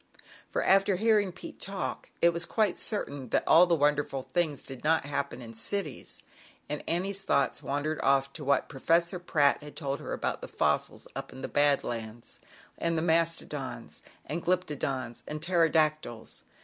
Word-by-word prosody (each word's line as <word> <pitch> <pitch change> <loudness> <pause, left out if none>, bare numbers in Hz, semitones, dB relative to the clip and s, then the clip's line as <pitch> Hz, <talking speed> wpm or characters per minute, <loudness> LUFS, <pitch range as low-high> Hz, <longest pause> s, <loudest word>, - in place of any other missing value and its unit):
For, - - -1
after 195 0 +4
hearing 210 -1 +3
Pete 180 - -10
talk, 195 0 -4
it 170 0 +6
was 170 0 -1
quite, 215 -5 +1
cer^in 145 - -2
that - - +2
all 175 +2 +7
the 170 - +4
wonderful 145 -3 +1
ftd 145 -6 -1
not 160 0 +3
happen 140 -3 -3
in 115 -1 -9
cities. 150 - -3 0.4
Then 175 +6 -2
thoughts 185 -9 +1
wandered 150 +2 -2
off 135 0 +2
to - - -7
what 140 0 +2
:essor 170 +5 +1
Pratt 145 -5 +3
had 150 0 -11
told 140 -2 -3
her - - -7
about - - -2
the - - -7
ils, - - +1
up - - -5
in 130 - -10
the - - -1
Bad 145 -1 +3
Lands; 115 0 -6 0.4
and 165 0 0
the 160 - 0
astodons, 165 - -1 0.2
and 165 +4 -4
Glyptodons 140 -9 -1
and 155 - -4
Ptero 170 0 +3
[Jctyls. 155 -7 0
155 Hz, 160 wpm, -29 LUFS, 140-175 Hz, 0.4 s, all